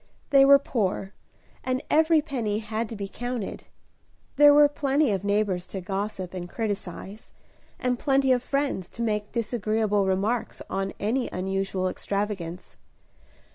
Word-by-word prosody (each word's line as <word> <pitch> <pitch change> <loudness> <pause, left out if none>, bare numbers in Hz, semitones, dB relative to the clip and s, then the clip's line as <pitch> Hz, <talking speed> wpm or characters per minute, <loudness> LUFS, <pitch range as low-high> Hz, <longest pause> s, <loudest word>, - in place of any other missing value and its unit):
They 275 -1 +7
were 280 0 +9
poor, 205 -7 -2 0.5
and 255 +1 -1
every 315 0 +4
penny 235 -9 -2
had 220 +1 -3
to 225 - -6
be 200 -1 -4
counted. 245 0 -5 0.7
There 290 +1 +8
were 295 0 +7
plenty 285 -2 +1
of 195 -2 -1
neighbors 200 -3 0
to 195 - -5
gossip 190 0 -4
and 175 -1 -6
criticise, 205 -1 -5 0.5
and 250 -1 0
plenty 270 -2 +2
of 250 -1 +3
friends 275 -8 -2
to 235 - -2
make 210 -2 -1
disagreeable 215 -3 0
remarks 215 +5 -1
on 195 0 -2
any 240 +5 0
unusual 190 0 -1
extravagance. 190 -3 -4
215 Hz, 135 wpm, -26 LUFS, 195-255 Hz, 0.7 s, were